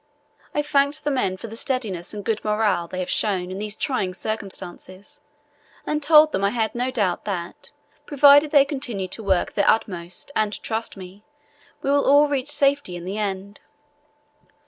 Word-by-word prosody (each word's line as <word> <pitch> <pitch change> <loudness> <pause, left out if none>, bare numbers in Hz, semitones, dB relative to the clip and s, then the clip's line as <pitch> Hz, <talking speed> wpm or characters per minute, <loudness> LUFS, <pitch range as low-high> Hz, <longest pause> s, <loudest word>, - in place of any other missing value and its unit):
I 295 - +1
thanked 285 +1 +1
the 295 - 0
men 195 -9 0
for 185 - -9
the 225 0 -8
steadiness 225 -9 -3
and 205 -1 -7
good 225 -2 -1
morale 210 -5 +1
they 185 - -7
have 185 -1 -3
shown 185 -4 0
in 190 - -5
these 210 0 -4
trying 195 -11 -2
circumstances, 195 -2 -7 0.7
and 300 0 -1
told 305 +1 +6
them 195 - -2
I 200 - +3
had 220 -1 -1
no 245 +2 -1
doubt 205 -9 -1
that, 180 -4 -5 0.4
provided 285 +1 +6
they 285 -2 +5
continued 240 -10 -4
to 225 - -5
work 190 -3 +1
their 200 - +2
utmost 180 0 -1
and 215 -1 +1
to - - -5
trust 225 -2 -3
me, 190 +1 -11 0.6
we 275 - +1
will 285 0 +3
all 290 +1 +6
reach 280 -1 -2
safety 285 - +1
in 175 0 -8
the 195 +3 -4
end. 200 0 -4
215 Hz, 180 wpm, -23 LUFS, 190-280 Hz, 0.7 s, told